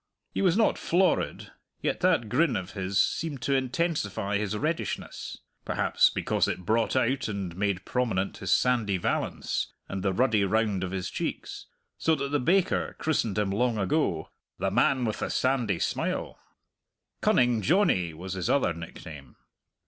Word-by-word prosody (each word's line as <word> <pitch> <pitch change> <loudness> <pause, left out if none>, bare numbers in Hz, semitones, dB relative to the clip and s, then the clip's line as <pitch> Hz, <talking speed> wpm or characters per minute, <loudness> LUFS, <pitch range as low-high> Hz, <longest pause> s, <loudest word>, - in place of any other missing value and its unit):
He - - -1
was 185 -1 +3
not 225 - +3
florid, 185 +2 +1 0.3
yet - - -1
that 115 - +2
grin 160 +6 +2
of 95 +2 -4
his 95 0 -1
seemed 145 -1 0
to 140 - +1
intensify 125 - 0
his 105 0 -2
reddishness 145 - -3 0.3
(perhaps - - +3
because - - 0
it 90 - -4
brought 115 +4 +1
out 130 0 +1
and 100 -5 -4
made 95 -1 -1
prominent 110 -7 -1
his 95 -2 -3
sandy 115 -6 +2
valance 85 - -1 0.2
and 95 - -4
the 95 - +1
ruddy 110 0 +2
round 105 -1 +1
of 95 - -2
his 95 -1 -3
cheeks), - - -4 0.3
so 160 - +3
that 140 -1 -3
the 145 +1 +1
baker 180 +8 +1
christened 115 -10 0
him 105 -2 +1
long 120 +3 +1
ago 95 - 0 0.3
"the 95 - -1
man 125 +3 +3
with 110 - -2
the - - -2
sandy 125 -8 +1
smile." - - -2 0.8
"Cunning 120 -2 +3
Johnny" 105 - +2
was 90 +4 -7
his 90 -3 -2
other 130 -11 +2
nickname. 80 -3 -10
110 Hz, 155 wpm, -27 LUFS, 95-135 Hz, 0.8 s, was